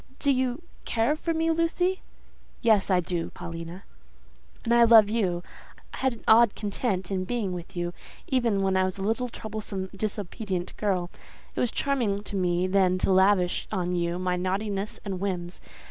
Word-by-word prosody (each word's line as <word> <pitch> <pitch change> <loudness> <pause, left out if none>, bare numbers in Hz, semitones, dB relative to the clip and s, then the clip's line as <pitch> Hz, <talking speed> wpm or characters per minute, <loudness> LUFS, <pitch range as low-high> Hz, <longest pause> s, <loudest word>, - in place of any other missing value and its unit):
"Do 280 - +2
you 260 +3 0 0.2
care 230 +6 +1
for 330 +2 -2
me, 325 0 +1
Lucy?" 355 +3 +1 0.6
"Yes, 220 -4 +4
I 185 -2 +4
do, 170 -1 -2
Paulina." 165 +2 -8 0.8
"And 235 - +2
I 235 0 +7
love 225 -3 +7
you. 185 -6 0 0.5
I - - -6
had 265 -1 +1
an 230 - -13
odd 225 -1 +6
content 200 -3 -2
in 185 -1 0
being 205 -2 -2
with 175 0 -8
you 175 0 -2 0.3
even 230 -6 +1
when 190 0 +1
I 190 - +3
was 185 0 -2
a 195 - -4
little, 225 +4 0
troublesome, 205 -4 -5
disobedient 200 -2 -4
girl; 185 -4 -1 0.4
it - - -5
was 245 - +2
charming 230 -7 0
to 205 - -6
me 180 -1 +1
then 185 -1 +3
to 190 - +2
lavish 190 -1 +3
on 180 -3 -1
you 170 0 0
my 180 0 0
naughtiness 195 +2 -2
and 195 -2 -3
whims. 180 -2 -3
200 Hz, 175 wpm, -27 LUFS, 180-230 Hz, 0.8 s, I